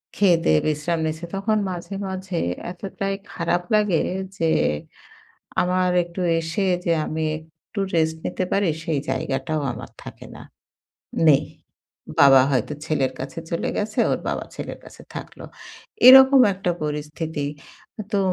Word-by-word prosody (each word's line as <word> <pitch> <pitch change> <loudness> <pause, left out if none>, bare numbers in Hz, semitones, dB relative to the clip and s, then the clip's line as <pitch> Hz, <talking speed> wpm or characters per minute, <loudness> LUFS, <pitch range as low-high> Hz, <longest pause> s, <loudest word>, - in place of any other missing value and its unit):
খেয়ে 195 -4 +5
দেয়ে 80 0 +4
বিশ্রাম 155 +2 -1
নিছে। 155 +2 -4
তখন 215 +3 0
মাঝে, 180 +2 -6
মাঝে 190 -1 -4 0.3
এতটাই 195 +2 -4 0.2
খারাপ 175 +1 0
লাগে 210 -6 +2 0.4
যে, 165 - +1 1.1
আমার 180 0 +1
একটু 170 +2 -8 0.2
এসে 165 +4 -2 0.2
যে 170 - +2
আমি 160 +1 -3 0.2
একটু 160 +6 -10
রেস্ট 160 -1 +2
নিতে 185 - -2
পারি, 200 0 +2 0.2
সেই 160 -4 0
জায়গাটাও 135 +3 -2
আমার - - -9
থাকে - - -10
না, - - -11 0.9
নেই। 145 0 +5 0.8
বাবা 135 -2 +8
হয়তো 130 +1 0
ছেলের 140 -5 0
কাছে 135 +4 -6
চলে 170 - -1
গেছে, 215 +1 -3
ওর - - +1
বাবা - - -2
ছেলের - - -6
কাছে - - -14
থাকলো। - - -8 0.6
এরকম 265 +1 +10
একটা 185 -1 -2
পরিস্থিতি। 150 0 -3 0.7
তো 200 - +2
165 Hz, 135 wpm, -23 LUFS, 150-190 Hz, 1.1 s, এরকম